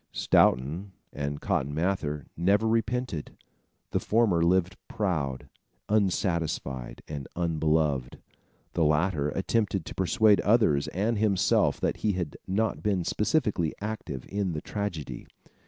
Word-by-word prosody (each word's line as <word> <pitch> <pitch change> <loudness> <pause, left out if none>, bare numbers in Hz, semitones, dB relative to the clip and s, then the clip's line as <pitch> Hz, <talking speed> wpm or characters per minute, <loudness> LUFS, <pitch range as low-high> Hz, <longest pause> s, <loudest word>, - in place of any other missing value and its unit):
Stoughton 80 +10 +2 0.2
and 70 0 -4
Cotton 70 +2 -1
Mather 75 -5 -1
never 100 +6 +2
repented. 115 - -1 0.5
The - - +1
former 105 -6 +2
lived 90 +1 +2
proud, 75 -11 -2 0.4
unsatisfied 85 - -1
and 70 -3 -6
unbeloved. 80 -5 0 0.6
The 85 - +2
latter 75 0 +2
attempted 95 0 0
to - - -7
persuade 105 +2 +3
others 105 -10 +3
and 105 +4 -1
himself 100 -4 +2
that - - 0
he 105 -2 0
had 90 -5 -3
not 110 +4 0
been 100 -4 0
specially 105 - 0
active 105 - -5
in 100 -3 -2
the 75 - -3
tragedy. 100 -8 -5
90 Hz, 120 wpm, -28 LUFS, 75-105 Hz, 0.6 s, persuade